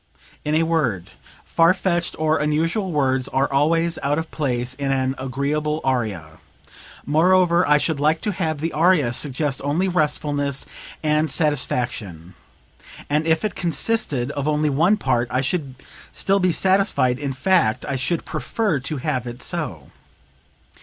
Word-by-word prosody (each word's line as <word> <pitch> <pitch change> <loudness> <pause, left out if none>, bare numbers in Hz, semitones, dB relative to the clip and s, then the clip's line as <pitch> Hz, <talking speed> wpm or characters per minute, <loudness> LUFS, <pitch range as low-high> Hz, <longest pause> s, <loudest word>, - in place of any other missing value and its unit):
"In 150 +1 0
a 160 - +3
word: 140 - -1 0.3
far 165 +3 +3
fetched 175 -2 -1
or 155 0 +1
unusual 165 +6 0
words 130 -3 +1
are 135 - +1
always 165 +4 +2
out 145 +1 0
of 160 0 -4
place 125 -4 -2
in 140 0 -2
an 130 -1 0
agreeable 145 +4 -2
aria; 105 -12 -2 0.7
moreover, 175 +3 +3
I 150 0 +5
should 150 0 -1
like 155 +2 +2
to 210 - -1
have 165 -5 -2
the 165 +1 -2
aria 155 -6 +3
suggest 140 +1 -1
only 155 +7 0
restfulness 145 -5 -1 0.4
and 155 0 +1
satisfaction; 120 - -1 0.8
and 155 +2 +1
if 160 +4 +2
it 210 - -2
consisted 165 - -1
of 140 -1 -3
only 150 0 +1
one 170 +9 +3
part 120 - 0
I 125 - 0
should 135 -2 -2 0.4
still 195 +1 +1
be 185 -1 +2
satisfied 185 - +2
in 140 -2 -3
fact, 130 -5 +1
I 140 - -2
should 155 +6 -1
prefer 155 - -1
to 140 +3 -4
have 130 -3 -2
it 120 +1 -7
so." 145 - -4
150 Hz, 150 wpm, -22 LUFS, 130-165 Hz, 0.8 s, I